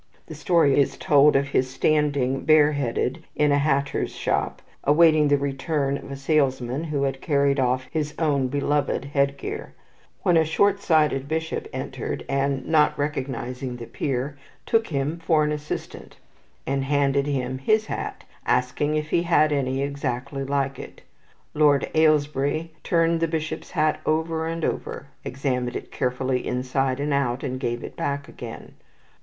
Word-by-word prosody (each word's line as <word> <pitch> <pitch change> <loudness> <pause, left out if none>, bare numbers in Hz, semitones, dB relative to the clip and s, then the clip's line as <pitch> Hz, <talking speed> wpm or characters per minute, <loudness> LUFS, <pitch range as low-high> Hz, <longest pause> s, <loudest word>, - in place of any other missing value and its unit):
The - - -9
story 160 -6 +3
is 140 - +1
told 150 -4 +5
of 140 +1 +2
his 130 -2 +1
standing 140 -2 +1
bare 150 -1 +5
headed 140 +2 -2
in 150 -1 +3
a 145 - +3
hatter's 140 -1 0
shop, - - -1 0.2
awaiting 155 0 +5
the 145 0 +4
return 140 0 -1
of 140 - -8
a 140 - -5
salesman 135 -1 0
who 150 -3 -1
had 135 -1 -2
carried 140 -2 +2
off 130 0 +1
his 150 -2 -2
own 145 -5 +1
beloved 145 0 0
head 140 0 0
gear, - - -6 0.5
when 175 -2 +4
a 160 - +5
shortsighted 160 -6 +2
bishop 160 +1 -3
entered, - - -5
and, 135 -1 0
not 155 -2 +3
recognizing 130 -3 -3
the 120 -1 -7
peer, 135 +3 -3 0.3
took 225 0 +2
him 145 +2 -2
for 160 -2 +2
an 150 - 0
assistant, 150 0 -6 0.5
and 135 0 -1
handed 140 0 +1
him 130 -2 -2
his 215 +10 +2
hat, - - -5 0.2
asking 145 +4 +1
him 155 - +2
if 150 - -13
he 170 - +3
had 155 -3 +3
any 135 -1 0
exactly 140 -1 -3
like 135 -1 -1
it. - - -10 0.5
Lord 150 -2 +3
Ailesbury 155 0 +2
turned 165 -1 +2
the 165 - +1
bishop's 160 -1 -4
hat 155 0 +1
over 160 +1 0
and 165 0 -2
over, 140 - -4
examined 125 -2 -2
it - - -6
carefully 125 0 -1
inside 130 +1 -1
and 145 0 -1
out, 130 -2 0
and 130 -2 -3
gave 120 -2 -2
it - - -8
back 140 0 -3
again. 115 -2 -9
140 Hz, 160 wpm, -24 LUFS, 135-155 Hz, 0.5 s, told